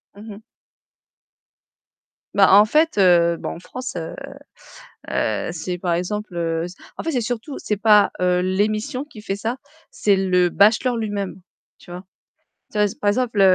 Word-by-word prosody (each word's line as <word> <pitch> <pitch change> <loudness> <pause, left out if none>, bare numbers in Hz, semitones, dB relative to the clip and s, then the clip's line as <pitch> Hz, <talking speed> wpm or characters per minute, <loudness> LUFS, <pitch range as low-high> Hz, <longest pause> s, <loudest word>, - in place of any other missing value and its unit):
Mmh 215 +2 -11
mh. 205 - -13 1.9
Bah 195 -1 +5
en 205 +1 +9
fait, 305 +8 +1
heu, 175 -3 +4
bon - - -5
en - - -10
France, 255 +6 -7
heu, 165 -1 -6 0.9
heu, 110 -2 -1
c'est 180 +2 -4
par 175 -1 -1
exemple, 210 +3 -4
heu, 165 -1 -1 0.3
en - - -5
fait, 325 - -2
c'est 260 - 0
surtout 245 +5 -4
c'est 210 - -2
pas 210 0 +5
l'émission 205 +8 0
qui 240 -8 -13
fait 200 -2 -3
ça, 230 +5 -3 0.3
c'est 205 -1 +2
le 180 -2 +2
bachelor 220 +6 +3
lui-même, 205 -4 -4 0.4
tu - - -15
vois? 180 +2 -8 0.7
Tu 210 - -3
vois, 210 - +4
par 205 - +2
exemple 230 -1 0
205 Hz, 155 wpm, -21 LUFS, 180-220 Hz, 1.9 s, en